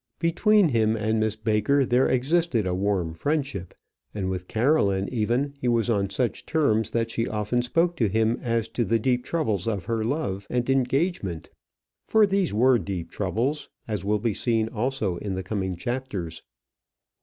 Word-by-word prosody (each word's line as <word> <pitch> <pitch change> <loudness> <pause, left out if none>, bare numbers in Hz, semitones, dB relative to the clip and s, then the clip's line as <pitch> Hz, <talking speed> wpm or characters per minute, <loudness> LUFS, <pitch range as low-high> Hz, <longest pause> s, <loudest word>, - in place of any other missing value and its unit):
Between 180 +3 +3
him 110 -3 +2
and 110 0 0
Miss 110 -1 0
Baker 110 +5 +2
there 125 +2 +3
existed 135 - +1
a 90 - -1
warm 95 -3 0
friendship, 135 - -2 0.4
and 95 -2 -2
with 90 -1 -5
Caroline, 110 -6 +2
even, 125 +4 0
he 125 - -1
was 120 0 +2
on 100 -3 +1
such 120 +4 -2
terms 110 -9 +2
that 115 0 -1
she 115 - -1
often 105 +3 0
spoke 165 +8 +1
to 115 - +2
him 110 +3 +1
as 115 -2 0
to 120 - -1
the 115 +2 +2
deep 125 +2 0
troubles 110 - -1
of 100 -6 -2
her 115 -1 -1
love 100 -7 -2
and 125 -1 -1
engagement. 135 - -1 0.6
For 220 -1 +5
these 195 -3 +1
were 125 +3 +4
deep 95 -2 -5
troubles, 135 +7 -2 0.2
as 105 -5 -3
will 105 +2 +1
be 110 +1 -1
seen 110 0 0
also 115 -6 -1
in 100 0 -4
the 95 - -4
coming 95 -1 -2
chapters. 100 -6 -4
115 Hz, 170 wpm, -25 LUFS, 100-130 Hz, 0.6 s, For